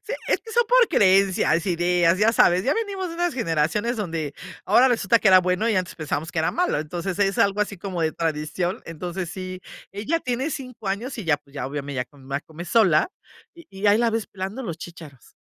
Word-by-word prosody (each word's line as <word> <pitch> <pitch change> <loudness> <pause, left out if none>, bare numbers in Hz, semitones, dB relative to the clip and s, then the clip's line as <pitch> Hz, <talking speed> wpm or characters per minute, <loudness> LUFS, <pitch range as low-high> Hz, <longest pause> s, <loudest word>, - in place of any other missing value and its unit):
Sí, 475 - -5 0.2
es - - +2
que 450 - -12
son 475 +1 +3
por - - +5
creencias, 190 -3 +3
ideas, 175 0 +2
ya 220 +2 +4
sabes, 180 -4 +4
ya 280 - +2
venimos 395 -5 -3
de 335 - -7
unas 345 -2 -1
generaciones 205 - 0
donde 165 -8 -3 0.3
ahora 260 +2 +5
resulta 230 -2 +3
que 205 - +3
era 185 -1 +8
bueno 185 +5 0
y 220 - +1
antes 185 -2 -2
pensamos 155 +1 -4
que 170 - -2
era 160 - +1
malo. 360 - 0
Entonces, 175 +5 -4
es 195 -1 +1
algo 200 +1 +2
así 205 -1 -1
como 185 -1 -5
de 155 - +1
tradición. 165 +5 -2
Entonces 175 +2 -5
sí 185 -1 -6 0.3
ella 280 +12 -1
tiene 255 +3 -2
5 255 -7 -6
años 230 +6 -3
y 210 - -5
ya 155 -3 +3
pues, 145 -1 -25
ya 140 - -3
obviamente 140 0 -5
ya 125 - -1
come 135 +1 -20
más 140 +1 -3
come 160 +2 -9
sola 190 - +3 0.4
y 335 - -15
y 195 +1 -3
ahí 205 +2 +5
la 235 -1 +2
ves 225 -2 -2
pelando 195 +7 -6
los 170 -8 -5
chícharos. 160 -8 -12
190 Hz, 220 wpm, -23 LUFS, 165-230 Hz, 0.4 s, era